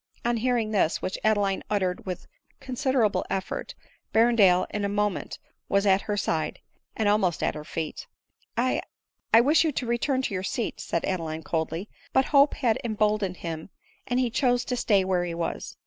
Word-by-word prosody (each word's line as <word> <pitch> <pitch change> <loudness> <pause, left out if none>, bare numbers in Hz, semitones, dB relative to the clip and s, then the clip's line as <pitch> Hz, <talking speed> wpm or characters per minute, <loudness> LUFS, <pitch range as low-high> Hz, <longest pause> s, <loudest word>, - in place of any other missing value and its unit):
On 240 0 +2
hearing 235 -2 0
this, 190 -6 +2
which 185 - -3
Adeline 205 -3 +2
uttered 190 -3 -1
with 180 - -4 0.3
consider 260 -2 +1
able 205 - 0
effort, 190 -1 -3 0.4
Berrendale 220 -6 +5
in 210 - -2
a 200 - 0
moment 205 -1 -1 0.3
was 200 +1 +2
at 195 0 +4
her 205 - 0
side, 160 -5 -1 0.4
and 220 - +1
almost 200 -5 +2
at - - +1
her 150 - -7
feet. 155 0 -5 0.3
" - - -38
I 255 +2 +1 0.3
— - - -57
I 225 - +8
wish 295 +6 +4
you 320 - +1
to 250 - -2
return 260 +3 0
to 210 - -2
your 185 - -1
seat," 215 +4 -3
said 170 - -2
Adeline 160 -4 -3
coldly; 165 +4 -2 0.3
but 265 - +4
hope 280 +1 +6
had 235 -5 +1
emboldened 210 -4 0
him 165 +1 -5 0.4
and 245 0 +1
he 250 -2 +1
chose 245 0 +2
to 250 - -1
stay 205 -5 +2
where 185 -2 +1
he 170 -1 -3
was. 170 0 -4
210 Hz, 190 wpm, -26 LUFS, 185-240 Hz, 0.4 s, I